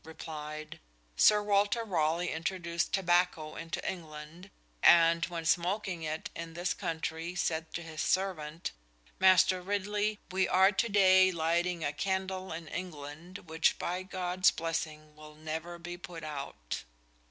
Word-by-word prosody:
replied: 155 -1 -7 0.4
"Sir 210 -1 +5
Walter 205 +3 +2
Raleigh 170 -3 0
introduced 170 0 -2
tobacco 175 -4 +1
into 165 +1 -5
England, 160 +1 -7 0.3
and 170 0 +6
when 170 -2 -5
smoking 180 +1 0
it 155 0 -4
in 165 -1 -7
this 175 +1 0
country 165 +1 -4
said 160 -2 -1
to 170 - -4
his 160 -1 -5
servant, 170 -4 -1 0.5
'Master 185 -1 +5
Ridley, 205 +2 -1
we 190 0 +2
are 190 +2 +5
to 220 +4 0
day 190 -2 +6
lighting 170 +1 0
a 145 - -1
candle 190 +2 -2
in 160 0 -6
England 170 +1 -7
which 160 +1 +2
by 180 +1 -2
God's 185 0 +2
blessing 155 -2 -4
will 155 0 -13
never 160 +3 -5
be 175 +1 -7
put 170 -2 -9
out'"! 140 - -5
170 Hz, 135 wpm, -31 LUFS, 160-185 Hz, 0.5 s, and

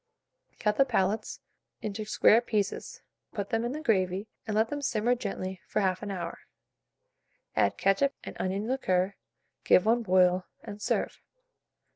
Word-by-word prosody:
Cut 210 -1 0
the 275 - +7
palates 210 -3 -1 0.4
into 215 0 -3
square 215 +1 +5
pieces, 210 -4 -2 0.3
put 200 -2 -3
them 225 0 +1
in 240 - -1
the 305 +3 -4
gravy, 190 - +1 0.2
and 215 - -1
let 220 +1 +3
them 290 0 -3
simmer 240 -3 +1
gently 190 -6 -4
for - - 0
1/2 190 +1 0
hour; 175 -3 -5 1.2
add - - +2
ketchup 195 +9 +2
and - - -7
onion 195 +3 -1
liquor, 195 -7 +1 0.5
give 180 - +5
one 235 +2 +3
boil, 185 -2 +3 0.2
and 210 -2 -8
serve. - - -1
210 Hz, 145 wpm, -29 LUFS, 185-230 Hz, 1.2 s, the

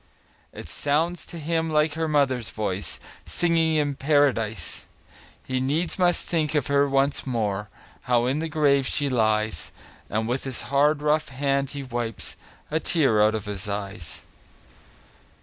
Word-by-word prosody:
It - - -9
sounds 160 +5 0
to 170 - -8
him 165 +1 -1
like 150 0 +2
her 160 +1 -1
mother's 135 -6 +1
voice, 100 -2 -3 0.3
Singing 165 -2 +2
in 145 -2 +1
Paradise! 135 - +1 0.6
He 130 0 -1
needs 155 +8 -1
must 175 -1 +3
think 160 -3 0
of 145 -4 +2
her 140 0 +2
once 135 +1 +1
more, 105 -5 -1 0.4
How 120 -1 +3
in 135 +4 0
the 160 0 -3
grave 140 -3 +3
she 145 -1 +2
lies; 110 -6 +1 0.4
And 110 +1 -1
with 125 +3 -1
his 130 -3 -2
hard, 145 +1 +3
rough 150 +1 +2
hand 140 0 0
he 140 -1 -5
wipes 120 -4 -4 0.4
A 160 - +1
tear 135 -11 +3
out 110 +1 +4
of 110 -1 -4
his 105 0 -4
eyes. 100 -4 -5
140 Hz, 150 wpm, -25 LUFS, 110-150 Hz, 0.6 s, out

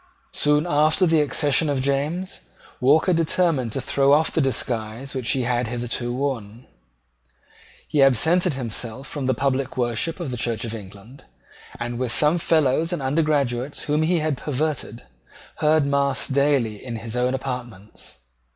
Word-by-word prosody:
Soon 150 +1 +2
after 155 +3 +3
the 160 -2 +3
accession 145 +1 +2
of 140 -2 0
James, 145 +7 -2 0.4
Walker 155 +7 +4
determined 165 -6 +1
to - - -1
throw 140 0 +2
off 155 +2 +3
the 160 - +1
disguise 120 -1 -2
which 130 -4 -3
he 130 - 0
had 120 0 0
hitherto 120 +1 -3
worn. 125 -4 -4 1.2
He 145 - +1
absented 160 - +3
himself 120 0 -4
from 135 -1 -4
the 130 - +2
public 135 +1 -1
worship 120 +8 -1
of 165 -7 -4
the 125 - -4
Church 115 -1 -1
of 115 - -5
England, 105 +4 -11 0.5
and, 120 0 -4
with 130 -2 -1
some 150 +6 +2
fellows 160 0 +2
and 175 - -2
undergraduates 140 -3 0
whom 150 +1 0
he 170 +3 +2
had 155 -4 -1
perverted, 150 -5 -3 0.5
heard 155 -1 +3
mass 140 -1 +1
daily 135 -6 +1
in 120 -2 -5
his 115 +1 -6
own 125 +1 +1
apartments. 120 - -7
135 Hz, 150 wpm, -23 LUFS, 120-150 Hz, 1.2 s, Walker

